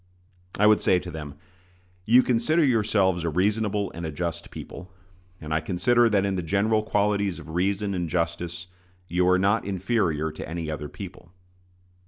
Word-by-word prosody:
I 105 - +3
would 105 0 +5
say 90 - +3
to 90 0 -6
them: 75 -3 -7 0.7
You 125 +3 +6
consider 145 +7 +2
yourselves 105 -7 +2
a 85 - 0
reasonable 100 +3 0
and 85 - -8
a 80 - -3
just 85 +2 -4
people; 90 +1 -10 0.5
and 75 0 -5
I 80 - +2
consider 115 +8 +2
that 100 -2 +2
in 100 -1 -1
the 90 - -1
general 100 +6 +1
qualities 100 -3 0
of - - -11
reason 100 +4 0
and 90 -3 -2
justice 85 0 -2 0.4
you 90 0 +1
are 90 - +5
not 100 +4 +2
inferior 95 -5 -1
to 80 - -8
any 80 -1 -4
other 75 -1 -5
people. 90 -3 -10
95 Hz, 170 wpm, -25 LUFS, 85-105 Hz, 0.7 s, You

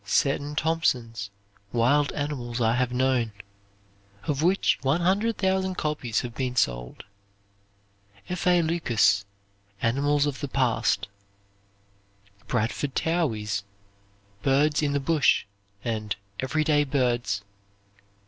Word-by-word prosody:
Seton 145 +5 +1
Thompson's 125 -10 0 0.4
"Wild 140 +5 +3
Animals 130 -5 -3
I 115 -1 +3
have 125 0 +1
Known"; 125 -3 +1 0.9
of 145 -1 -1
which 185 +4 +2
100,000 190 +4 +1
copies 150 -9 -1
have 120 -1 -6
been 125 0 -2
sold. - - -1 1.2
F. 180 0 -3
A. 175 -1 +5
Lucas' 120 -11 +2 0.5
"Animals 140 +6 +2
of 145 -2 -3
the 145 - -3
Past" 130 -7 +1 1.4
Bradford 115 +5 -1
Towey's 110 - 0 0.8
"Birds 145 +5 +3
in 145 -2 0
the 140 - +1
Bush," 140 -2 +3 0.4
and 110 -3 -2 0.2
"Everyday 150 +2 +2
Birds." 120 -8 0
135 Hz, 100 wpm, -26 LUFS, 115-155 Hz, 1.4 s, A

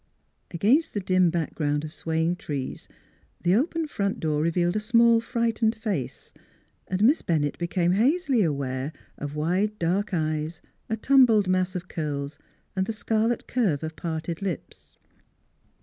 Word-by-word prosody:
Against 230 - +2
the - - +1
dim 185 -2 +3
background 150 -3 -1
of 155 0 -7
swaying 165 +2 -1
trees 140 -6 -5 0.6
the 175 +1 +3
open 320 - +1
front 200 -9 -2
door 150 -2 0
revealed 175 +3 +1
a - - +2
small, 230 +1 +4
frightened 230 -1 0
face, 210 - -4 0.5
and 190 +2 0
Miss 275 +8 +5
Bennett 150 -4 0
became 175 0 +1
hazily 265 - +2
aware 140 -3 -1 0.3
of 145 0 -5
wide 185 +8 0
dark 190 +5 0
eyes, 155 -1 -1 0.3
a 220 - -1
tumbled 230 -5 +5
mass 185 0 +1
of 180 0 -4
curls, 145 -3 -4 0.4
and 190 0 0
the 225 - -2
scarlet 225 +2 0
curve 195 - 0
of 160 0 -5
parted 165 +1 -4
lips. 185 -7 -6
185 Hz, 145 wpm, -26 LUFS, 160-220 Hz, 0.6 s, Miss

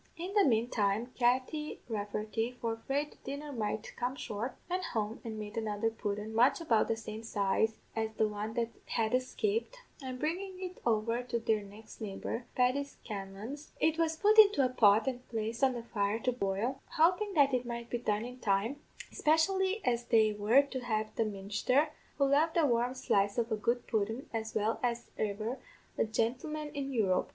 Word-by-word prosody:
"In 360 +4 -5
the 415 -1 +5
manetime, 225 - +1
Katty 260 +5 0
Rafferty, 215 +2 -2
for 230 -1 -1
'fraid 280 +6 -2
the - - -18
dinner 285 +2 -5
might 215 -2 -3
come 245 +2 -2
short, 230 -1 -4
went 365 +1 -1
home 220 - -2
and 225 -2 -5
made 210 +1 -6
another 220 0 0
pudden 210 -1 -4
much 240 +8 +4
about 235 -10 +2
the 225 - +1
same 220 0 -7
size 220 0 +1 0.2
as 220 0 0
the 220 - +2
one 210 +1 -4
that 235 -1 0 0.2
had 225 0 0
escaped, 420 - 0 0.2
and 260 -1 -5
bringin' 365 +7 -2
it 370 -1 -6
over 230 +1 +1
to 245 -1 -2
their 220 -2 +1
next 210 +3 -13
neighbour, 220 +3 -4
Paddy 255 +3 +3
Scanlan's, 220 +2 -8
it 320 +1 +2
was 325 -1 +1
put 425 +4 +5
into 405 -10 +7
a - - +1
pot 215 -3 +5
and 255 -2 -4
placed 225 +2 -3
on 265 -1 +5
the 240 -1 -5
fire 205 -2 0
to 255 - +1
boil, 225 +3 -1 0.2
hopin' 365 +5 +3
that 280 -3 +5
it 250 -1 +2
might 235 -1 -5
be 240 - 0
done 215 -1 0
in 250 +1 -8
time, 210 +5 +1 0.3
espishilly 380 +6 +2
as 240 -1 +1
they 220 -2 +4
were 215 +7 +5
to 275 -2 -5
have 220 -3 -2
the 225 - +1
ministher, 210 +8 +1 0.3
who 280 - +4
loved 300 +5 +3
a 325 - +5
warm 245 0 +1
slice 200 -5 +1
of 235 -1 0
a - - +3
good 235 +3 0
pudden 220 +3 -1
as 220 -1 -3
well 215 +1 +1
as 235 -1 -2
e'er 215 +4 -2 0.4
a - - +2
gintleman 255 +8 -2
in 275 -2 -3
Europe. 200 -7 +1
235 Hz, 185 wpm, -32 LUFS, 215-275 Hz, 0.4 s, into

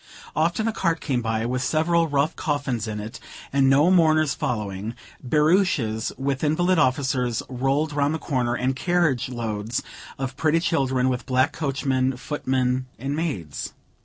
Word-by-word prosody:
Often 170 +8 +1
a 225 - 0
cart 170 -5 0
came 130 -5 -1
by, 110 -1 -1
with 125 +1 -1
several 165 +4 +2
rough 145 +1 +1
coffins 140 -6 -2
in 105 -1 -4
it 110 +2 -7 0.3
and 135 -1 +4
no 145 +6 +5
mourners 155 -5 +4
following; 105 -1 -3 0.3
barouches, 150 - +2
with 135 +1 -2
invalid 175 +4 +2
officers, 130 -3 +1
rolled 135 +4 0
round 145 +1 +1
the - - -1
corner, 125 -5 -1
and 130 +1 0
carriage 160 -6 +1
loads 115 -2 -3 0.3
of 135 -1 -4
pretty 155 +3 +2
children, 130 -6 +1
with 125 0 -2
black 130 +1 +2
coachmen, 135 -3 0
footmen, 130 -2 -1
and 135 +3 -3
maids. 105 - -3
135 Hz, 150 wpm, -24 LUFS, 125-155 Hz, 0.3 s, no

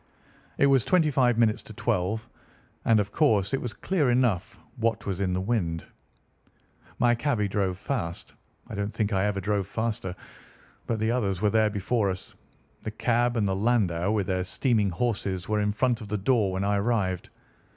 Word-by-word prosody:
It - - +4
was 135 -4 +4
twenty 165 -5 +3
five 125 -3 +3
minutes 115 -2 +3
to - - -11
twelve, 105 +6 -1 0.6
and 115 -2 +5
of 105 0 -1
course 105 - +2
it 135 - +1
was 120 - -3
clear 160 -3 0
enough 120 -5 +1 0.2
what 115 -2 0
was 95 -1 -2
in 95 -2 +1
the 90 - 0
wind. 95 -6 -1 1.1
"My 120 0 +4
cabby 120 -4 0
drove 95 -2 -1
fast. 95 -7 -4 0.3
I - - -9
don't 100 0 -2
think 110 -2 0
I 95 +1 +2
ever 105 -1 0
drove 100 0 -1
faster, 105 -5 -3 0.7
but 115 - 0
the 110 +1 0
others 100 -7 0
were 105 +1 +2
there 110 -1 +3
before 105 +1 0
us. 95 0 -6 0.5
The - - -4
cab 120 +2 +1
and 105 -3 +2
the 95 - 0
landau 100 -5 +1
with 105 -3 +1
their 95 0 -1
steaming 105 +2 +1
horses 95 -2 -2
were 105 -1 +1
in 105 0 +1
front 120 +2 0
of 105 - -7
the 105 +1 -1
door 105 -1 +2
when 95 +1 -1
I 100 0 +1
arrived. 100 -4 0
105 Hz, 185 wpm, -27 LUFS, 95-120 Hz, 1.1 s, and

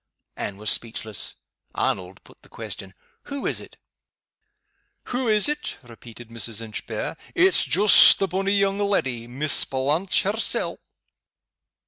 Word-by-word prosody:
Anne 100 - -5
was 105 +1 0
speechless. 110 -3 -4 0.4
Arnold 95 0 -2
put - - -20
the - - -21
question: 95 -1 -7 0.3
"Who 280 -1 -6
is - - -1
it?" - - -15 1.4
"Wha 250 0 -1
is't?" 220 +8 0
repeated 120 -1 -13
Mrs. 115 -1 -3
Inchbare. 110 -2 -5 0.2
"It's 375 +1 +4
joost 205 +2 +7
the 195 - 0
bonny 195 +3 -1
young 200 0 +1
leddy 135 - -1
Miss 140 +5 +4
Blanche 145 +10 0
hersel'." 210 +3 0
145 Hz, 120 wpm, -23 LUFS, -, 1.4 s, joost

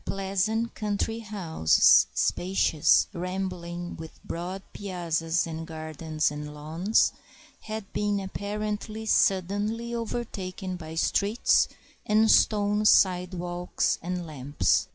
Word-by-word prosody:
Pleasant 200 +4 -1
country 210 +2 -2
houses, 185 - +4
spacious, 175 -4 +3
rambling, 180 -1 -4
with 160 0 -10
broad 180 +3 -5
piazzas 170 -3 -1
and 165 0 -6
gardens 155 -1 -2
and 150 0 -7
lawns, 165 +8 +1 0.5
had 215 -2 -6
been 205 -1 0
apparently 210 +2 -4
suddenly 205 +4 +1
overtaken 195 -6 -4
by 160 -2 -8
streets 205 +7 +2 0.4
and 215 +1 +4
stone 210 -1 +3
sidewalks 180 -3 +2
and 180 0 -4
lamps. 145 -2 0
185 Hz, 95 wpm, -27 LUFS, 165-210 Hz, 0.5 s, houses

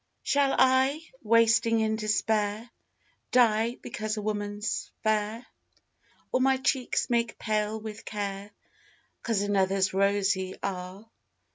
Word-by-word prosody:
Shall 280 -1 +2
I, 260 +3 +4 0.2
wasting 230 0 +3
in 220 0 +1
despair, 215 +1 -1 0.6
Die 230 -1 +3
because 215 0 -4
a - - -2
woman's 205 0 -3
fair? 215 +2 0 0.9
Or 255 - +1
my 265 0 +3
cheeks 260 -1 0
make 235 -1 0
pale 215 0 -1
with 215 0 -8
care, 200 -1 -5 0.7
'Cause 225 -4 0
another's 195 -1 +1
rosy 195 -1 +1
are? 190 +2 -5
215 Hz, 110 wpm, -27 LUFS, 205-230 Hz, 0.9 s, I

